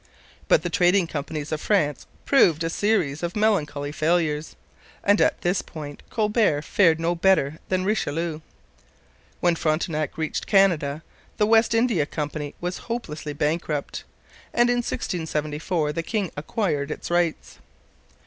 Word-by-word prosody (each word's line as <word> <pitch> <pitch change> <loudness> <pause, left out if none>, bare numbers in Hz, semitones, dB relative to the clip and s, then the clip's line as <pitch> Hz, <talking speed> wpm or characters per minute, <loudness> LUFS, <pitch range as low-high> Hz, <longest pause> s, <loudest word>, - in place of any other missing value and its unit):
But 155 - +4
the 175 - -3
trading 180 +2 +3
companies 150 -1 -5
of 155 -1 -2
France 150 -9 0 0.2
proved 170 - +4
a 165 - -1
series 180 -9 0
of 170 0 -3
melancholy 155 -9 0
failures, 155 -1 0 0.5
and 205 +1 +4
at - - +2
this 180 +2 +1
point 145 -3 -9
Colbert 210 -8 +1
fared 165 -4 +3
no 165 +1 +1
better 165 -4 +2
than 185 0 0
Richelieu. 165 -5 -1 1.0
When 175 -1 +3
Frontenac 155 -2 -1
reached 160 -1 -3
Canada 165 -7 +3 0.3
the 210 - +3
West 225 +1 +4
India 225 -11 +2
Company 150 -1 -4
was 180 +1 -4
hopelessly 155 -11 -4
bankrupt, 150 0 -2 0.5
and 240 0 +4
in 245 - +1
1674 155 -6 -2
the 165 - -2
king 200 0 -2
acquired 145 -2 -2
its 155 - -5
rights. 175 -2 -1
165 Hz, 135 wpm, -24 LUFS, 150-195 Hz, 1.0 s, But